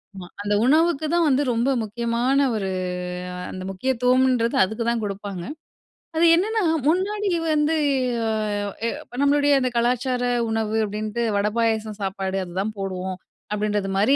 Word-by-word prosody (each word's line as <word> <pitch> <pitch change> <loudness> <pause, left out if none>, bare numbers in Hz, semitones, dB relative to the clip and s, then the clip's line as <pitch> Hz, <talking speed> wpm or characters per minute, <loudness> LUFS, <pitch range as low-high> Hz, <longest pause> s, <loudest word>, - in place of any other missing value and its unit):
ஆமா. 180 -2 -8
அந்த 205 0 -1
உணவுக்கு 315 +2 +3
தான் 345 -1 +3
வந்து 270 0 +3
ரொம்ப 235 +3 +1
முக்கியமான 235 +5 +1
ஒரு, 195 -3 -2 0.8
அந்த 185 - -7
முக்கியத்துவம்ன்றது 250 +3 +2
அதுக்கு 220 +5 -2
தான் 235 -1 +1
குடுப்பாங்க. 200 -3 -5 0.7
அது 325 +2 +4
என்னன்னா, 435 +6 +1 0.3
முன்னாடி 400 +5 +1 0.3
வந்து 300 +1 +2 1.1
எ - - +1 0.3
நம்ளுடைய 285 0 +4
அந்த 255 -1 0
கலாச்சார 250 +1 +1 0.3
உணவு 220 -1 -1
அப்டின்ட்டு 215 +3 -3
வட, 200 +1 +2
பாயாசம், 220 -2 0
சாப்பாடு 195 0 -2
அதுதான் 190 +4 -3
போடுவோம். 185 -1 -4 0.4
அப்டின்றது 210 -1 -1
மாரி 215 +8 +4
230 Hz, 125 wpm, -23 LUFS, 205-275 Hz, 1.1 s, அது